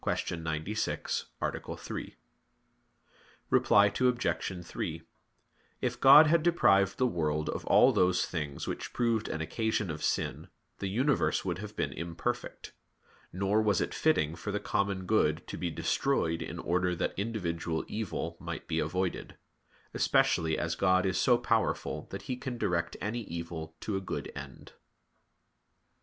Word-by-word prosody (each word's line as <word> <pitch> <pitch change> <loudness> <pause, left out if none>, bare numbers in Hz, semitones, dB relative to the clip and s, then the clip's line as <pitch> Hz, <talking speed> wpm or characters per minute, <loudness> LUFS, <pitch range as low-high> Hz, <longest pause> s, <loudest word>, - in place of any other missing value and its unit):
96, 80 +5 -2 0.2
A. - - -3
3). - - -6 1.4
Reply 100 0 +5 0.2
Obj. 125 -1 +2 0.4
3: 80 0 -4 0.8
If 125 -1 -2
God 140 +4 +9
had 165 +2 +4
deprived 100 - +3
the 130 - +2
world 75 -8 0
of - - -3
all - - +6
those 90 0 +2
things 75 -5 -4
which - - -5
proved 115 -3 +1
an 80 - -3
occasion 105 +3 -1
of 75 - -6
sin, - - -1 0.3
the 100 - -2
universe 130 +7 +1
would 90 -2 -2
have 105 0 -8
been - - -2
imperfect. 85 +9 -4 0.6
Nor 100 +4 +1
was 105 -4 +2
it - - -2
fitting 75 +1 +2
for 95 +5 -5
the 105 - -1
common 100 -2 -1
good 85 -6 +2
to - - -6
be 90 - -2
destroyed 80 0 0
in - - -5
order 90 0 0
that 85 - -1
individual 85 -6 -2
evil 90 -6 -4
might - - -6
be - - 0
avoided; 90 +3 -2 0.6
especially 80 -1 +2
as 85 -1 -1
God 95 +2 +3
is 95 -1 +1
so 125 -2 +5
powerful 115 -2 -1
that - - -7
He 125 - -3
can 125 -1 -5
direct 85 -6 -1
any 110 +4 -2
evil 85 -1 -6
to 105 - -2
a - - -3
good 95 - -5
end. - - -9
95 Hz, 145 wpm, -30 LUFS, 85-110 Hz, 1.4 s, God